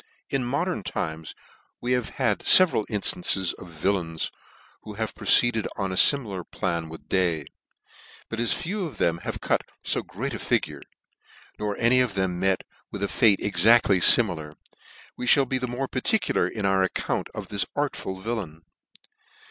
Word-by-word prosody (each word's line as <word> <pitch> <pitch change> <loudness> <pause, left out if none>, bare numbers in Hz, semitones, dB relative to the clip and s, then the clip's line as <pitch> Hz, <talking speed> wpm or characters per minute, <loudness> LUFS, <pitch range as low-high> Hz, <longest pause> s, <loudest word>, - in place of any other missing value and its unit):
IN 135 -2 -1
modern 145 - -2
times 80 -3 -5 0.4
we 125 - -4
have 125 -2 -1
had 115 -6 0
feveral 180 - +7
inflances 105 - +1
of 95 - -11
villains 80 0 -2 0.5
who 105 - -10
have 110 +1 -4
proceeded 120 -3 +2
on 95 -2 -3
a - - -4
fimilar 105 -6 +4
plan 85 -2 -4
with 80 - -12
Day 90 -4 0
i - - -13 0.8
but 115 - -6
as 120 - +1
few 190 +4 -3
of 155 - -9
them 85 0 0
have - - -6
cut - - 0 0.2
fo - - -1
great - - -6
a - - -6
figure, - - -2 0.8
nor 105 -1 -3
any 120 +2 +3
of 125 -6 0
them 95 -2 -2
met 95 0 0 0.3
with 100 - -5
a - - 0
fate 105 -2 +2
exactly 105 +1 +3
fimilar, 85 -7 +5 0.6
we 125 - -3
mall 140 - +2
be 130 0 -2
the 125 - -3
more 125 +3 -4
particular 130 - 0
in 105 +1 -5
our 95 -1 +2
account 95 - -2
of - - -7
this 100 -3 -1
artful 145 -9 -3
villain. 95 -6 -6
105 Hz, 165 wpm, -24 LUFS, 90-125 Hz, 0.8 s, feveral